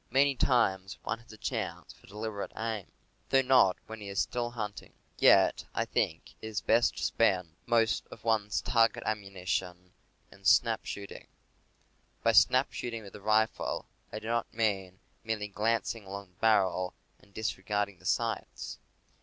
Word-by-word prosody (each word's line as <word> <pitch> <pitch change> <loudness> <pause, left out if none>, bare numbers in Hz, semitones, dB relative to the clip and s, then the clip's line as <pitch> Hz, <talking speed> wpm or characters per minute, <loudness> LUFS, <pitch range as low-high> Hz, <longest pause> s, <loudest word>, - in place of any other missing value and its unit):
Many 140 +3 +4
times 95 -8 +1
one 115 - -2
has 115 - -16
a 110 - -12
chance - - -4
for - - -21
deliberate 105 0 -5
aim 110 -4 -3 0.4
(though 135 0 +4
not 125 -8 +5
often - - -35
when 110 -1 -9
he 100 - -6
is 100 - -2
still 120 -1 -1
hunting). 105 -4 -6 0.3
Yet - - +5
I - - +1
think 80 - -1
it - - -6
is 110 -2 -2
best 115 +2 +3
to - - -3
spend 90 -7 +2
most 115 -2 +2
of 110 - -13
one's 110 -2 +1
target 115 -2 +3
ammunition 95 -3 -3 0.4
in - - -17
snap - - +4
shooting. 100 -1 -7 1.0
By 115 - +5
snap 125 +4 +5
shooting 115 -2 -4
with 100 - -11
the 105 - -10
rifle 110 +2 +1 0.3
I - - -5
do 110 - -8
not 115 +1 -1
mean 95 -4 -1 0.2
merely 110 -2 -2
glancing 115 +1 -1
along 100 0 -7
the 90 - -33
barrel 95 -4 +2 0.2
and 100 - -23
disregard 105 -1 -1
ing 95 - -18
the - - -18
sights. - - -2
110 Hz, 165 wpm, -30 LUFS, 100-115 Hz, 1.0 s, not